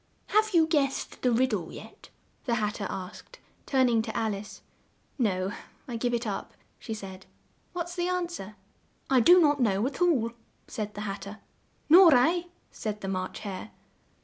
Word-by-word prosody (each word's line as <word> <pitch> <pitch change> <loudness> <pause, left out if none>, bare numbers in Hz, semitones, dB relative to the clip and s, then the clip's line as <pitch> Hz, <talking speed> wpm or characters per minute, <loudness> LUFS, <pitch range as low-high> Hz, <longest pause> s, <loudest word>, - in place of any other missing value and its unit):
"Have 430 -2 +2
you 325 -1 +6
guessed 290 -4 -1
the 250 - +2
rid 255 +2 +2
dle 180 -6 -3
yet?" - - -12 0.4
the 240 -3 +1
Hat 210 -2 0
ter 205 -3 -4
asked, 190 - -8 0.3
turn 260 -2 +3
ing 230 -2 +3
to 220 0 -5
Al 220 -2 0
ice. 200 +1 -9 0.6
"No, 190 -5 0 0.4
I 240 - -5
give 240 +1 -1
it 235 +1 -3
up," 205 -3 -4 0.3
she 220 - -5
said. 190 -3 -9 0.5
"What's 350 0 -4
the 350 -1 -1
an 360 -1 0
swer?" 215 - -8 0.6
"I 260 - +6
do 355 +10 +7
not 290 -4 +3
know 205 -2 +2
at 270 +5 -4
all," 270 -11 +3 0.4
said 210 -1 -5
the 205 - -5
Hat 200 -1 -4
ter. 200 +2 -8 0.5
"Nor 335 -1 +8
I," 335 +8 +3 0.3
said 210 -1 -5
the 195 - -5
March 185 -1 -4
Hare. 200 0 -6
235 Hz, 180 wpm, -28 LUFS, 205-315 Hz, 0.6 s, Nor